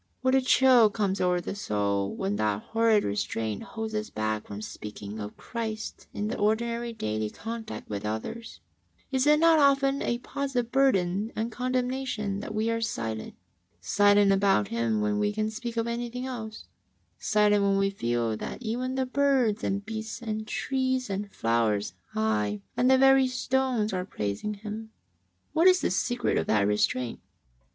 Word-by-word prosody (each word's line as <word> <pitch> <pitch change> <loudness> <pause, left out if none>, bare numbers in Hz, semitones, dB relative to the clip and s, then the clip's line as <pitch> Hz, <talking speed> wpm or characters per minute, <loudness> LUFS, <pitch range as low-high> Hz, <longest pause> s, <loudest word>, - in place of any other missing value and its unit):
What 260 0 +2
a 265 - +5
chill 255 -3 +6
comes 200 -2 -1
over 180 -1 +2
the 175 - -5
soul 100 - -1
when 100 +2 -1
that 105 -1 -1
liorrid 225 -2 +4
restraint 105 +1 -2
holds 220 -1 -5
us 215 0 -2
back 110 0 -2
from 100 - -6
sp>caking 105 0 -7
of 105 0 -7
Christ 220 -2 -5
in 205 - -3
the 220 - -3
ordinary 235 +3 0
daily 110 - -2
contact 225 - -7
with 100 -1 -4
others! 110 - -5 0.5
Is 265 +1 +1
it 300 0 +6
not 330 -1 +5
often 275 -1 +3
a 240 - 0
positive 250 -2 -3
burden 210 -6 +2
and 225 +2 -2
condemnation 250 -4 -2
that 215 - -6
we 220 +2 +1
are 230 0 -1
silent? 110 - -3 0.3
— - - -42
silent 205 0 +4
about 195 - +3
Him 115 -2 0
when 105 0 0
we 105 0 +1
can 215 - -1
speak 235 +1 -6
of 230 - +1
anything 240 +1 -3
else; 225 -4 -6 0.5
silent, 210 -1 +3
when 200 0 +2
we 195 0 +2
feel 120 - -1
that - - -6
even 250 +3 -2
the 265 0 0
birds 255 -5 +2
and 200 +1 -1
beasts 220 0 -5
and 220 -2 -4
trees 260 -3 -1
and 200 +1 -3
flowers, 110 -4 0 0.2
aye, 105 -1 0
and 250 - +3
the 265 - +6
very 270 0 +6
stones, 255 -4 0
arc 185 +1 -3
praising 105 - -3
Him? 215 +2 -7 0.6
What 330 +3 +5
is 365 0 +6
the - - 0
secret 245 0 0
of - - -3
that 105 -2 +3
restraint? 115 +4 0
215 Hz, 170 wpm, -27 LUFS, -, 0.6 s, chill